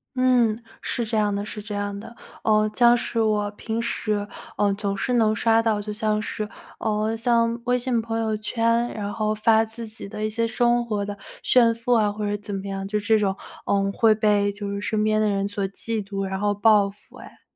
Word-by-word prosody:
嗯， 245 Hz, -3 st, +3 dB, 0.2 s
是 235 Hz, -, -2 dB
这 225 Hz, +1 st, -3 dB
样 210 Hz, -1 st, +2 dB
的 200 Hz, +1 st, -2 dB
是 215 Hz, -, -7 dB
这 210 Hz, 0 st, -7 dB
样 205 Hz, 0 st, -3 dB
的。 225 Hz, +3 st, -10 dB, 0.3 s
呃， 215 Hz, -1 st, +3 dB
像 240 Hz, -1 st, +6 dB
是 230 Hz, -1 st, -1 dB
我 210 Hz, -1 st, +1 dB
平 220 Hz, +2 st, -4 dB
时， 210 Hz, -3 st, -1 dB, 0.3 s
呃 205 Hz, -1 st, +2 dB
总 200 Hz, 0 st, -2 dB
是 250 Hz, -, -1 dB
能 220 Hz, -3 st, +3 dB
刷 225 Hz, +1 st, +3 dB
到， 220 Hz, -2 st, +1 dB
就 210 Hz, 0 st, -5 dB
像 215 Hz, 0 st, 0 dB
是， 210 Hz, 0 st, -4 dB, 0.3 s
呃 215 Hz, 0 st, 0 dB
像 230 Hz, 0 st, +1 dB
微 250 Hz, 0 st, +1 dB
信 245 Hz, -2 st, 0 dB
朋 225 Hz, 0 st, -3 dB
友 220 Hz, -1 st, 0 dB
圈， 230 Hz, +2 st, 0 dB
然 205 Hz, -1 st, -4 dB
后 215 Hz, -1 st, 0 dB
发 220 Hz, +1 st, +4 dB
自 225 Hz, +1 st, -8 dB
己 215 Hz, -2 st, -9 dB
的 215 Hz, +1 st, -4 dB
一 -, -, -1 dB
些 230 Hz, +2 st, -1 dB
生 240 Hz, +1 st, +2 dB
活 210 Hz, -3 st, -2 dB
的 205 Hz, 0 st, -6 dB, 0.3 s
炫 235 Hz, -2 st, +5 dB
富 230 Hz, +2 st, -1 dB
啊， 215 Hz, -3 st, +3 dB
或 210 Hz, 0 st, -3 dB
者 205 Hz, -, 0 dB
怎 205 Hz, 0 st, -6 dB
么 195 Hz, 0 st, -4 dB
样， 195 Hz, 0 st, -4 dB
就 210 Hz, +1 st, 0 dB
这 220 Hz, +1 st, +3 dB
种， 195 Hz, -2 st, 0 dB, 0.3 s
呃 195 Hz, 0 st, +1 dB
会 220 Hz, 0 st, +4 dB
被 205 Hz, -2 st, +2 dB
就 200 Hz, 0 st, -6 dB
是 200 Hz, 0 st, -3 dB
身 215 Hz, 0 st, -1 dB
边 215 Hz, 0 st, +2 dB
的 215 Hz, -, +2 dB
人 200 Hz, 0 st, 0 dB
所 205 Hz, -1 st, -2 dB
嫉 220 Hz, +2 st, -3 dB
妒， 195 Hz, 0 st, -4 dB
然 190 Hz, -, -3 dB
后 205 Hz, 0 st, +2 dB
报 205 Hz, -1 st, +4 dB
复 200 Hz, +1 st, -16 dB
哎。 -, -, -13 dB
215 Hz, 240 characters per minute, -24 LUFS, 205-230 Hz, 0.3 s, 像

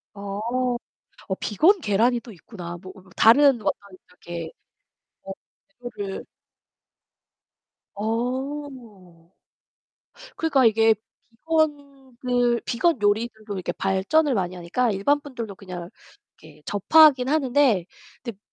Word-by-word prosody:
어, 200 Hz, 0 st, -6 dB, 0.9 s
어 190 Hz, -, -1 dB
비건 345 Hz, -, +3 dB
계란이 235 Hz, +3 st, +2 dB
또 235 Hz, -, -12 dB
있구나. 175 Hz, -2 st, -9 dB
뭐 185 Hz, -1 st, -10 dB
어 -, -, -14 dB
어 185 Hz, -, -21 dB
다른 265 Hz, +1 st, +5 dB
어떤 200 Hz, -, +1 dB, 0.4 s
이렇게 170 Hz, -2 st, -8 dB, 0.7 s
어 195 Hz, -, -7 dB, 0.5 s
그거를 205 Hz, -5 st, -6 dB, 1.7 s
어. 230 Hz, -, -5 dB, 1.1 s
그러니까 290 Hz, -5 st, +2 dB
이게 225 Hz, 0 st, +4 dB, 0.4 s
비건들 265 Hz, -4 st, -1 dB
비건 265 Hz, +1 st, +1 dB
요리들도 215 Hz, 0 st, -1 dB
이렇게 185 Hz, -, -3 dB
발전을 220 Hz, +10 st, +1 dB
많이 185 Hz, -2 st, -2 dB
하니까 195 Hz, +8 st, -1 dB
일반 245 Hz, +10 st, +1 dB
분들도 235 Hz, -8 st, -7 dB
그냥 180 Hz, -2 st, -9 dB, 0.5 s
이렇게 150 Hz, -1 st, -17 dB
접하긴 260 Hz, +5 st, +5 dB
하는데 270 Hz, -, +2 dB, 0.4 s
근데 230 Hz, -6 st, -7 dB
225 Hz, 225 characters per minute, -24 LUFS, 195-270 Hz, 1.7 s, 다른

